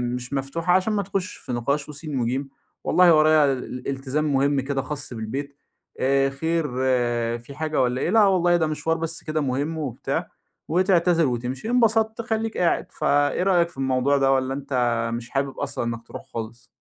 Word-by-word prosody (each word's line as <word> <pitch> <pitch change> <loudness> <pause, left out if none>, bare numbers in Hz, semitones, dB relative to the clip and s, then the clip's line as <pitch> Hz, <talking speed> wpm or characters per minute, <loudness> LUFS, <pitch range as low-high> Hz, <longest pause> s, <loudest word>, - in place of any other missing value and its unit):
مش 125 +2 -6
مفتوحة 160 +6 0
عشان 190 +4 +2
ما 205 -1 0
تخشش 195 -1 -3
في - - -8
نقاش 140 +5 -1
وسين 150 -2 -4
وجيم، 130 +4 -1 0.3
والله 180 -2 +5
وريا 155 -2 +5
ال 125 -1 -6
التزام 140 +2 -1
مهم 140 0 +2
كده 135 0 -2
خاص 140 -1 -6
بالبيت، 135 +6 -5 0.4
آآ، 135 +1 +3
خير 160 +4 -1 0.7
في 130 +4 -12
حاجة 155 -1 0
والّا 125 0 0
إيه؟ - - 0
لا 215 0 +5
والله 175 -3 +3
ده 160 -2 +1
مشوار 160 +1 -1
بس 165 0 -4
كده 155 0 -1
مهم 145 +4 -1
وبتاع، 135 -6 -3 0.4
وتعتذر 175 -2 +3
وتمشي، 125 - -3
انبسطت 225 -2 +2
خليك 225 -1 -2
قاعد. 175 - +1
ف - - -9
إيه 145 +2 +2
رأيك 175 -3 +3
في 170 - -20
الموضوع 135 +1 +2
ده، 135 -1 +3
والّا 130 0 +1
أنت 125 -4 0
مش 120 +1 -5
حابب 135 0 -2
أصلًا - - -2
إنك 115 0 -5
تروح - - -8
خالص؟ 115 +2 -7
145 Hz, 180 wpm, -24 LUFS, 130-170 Hz, 0.7 s, والله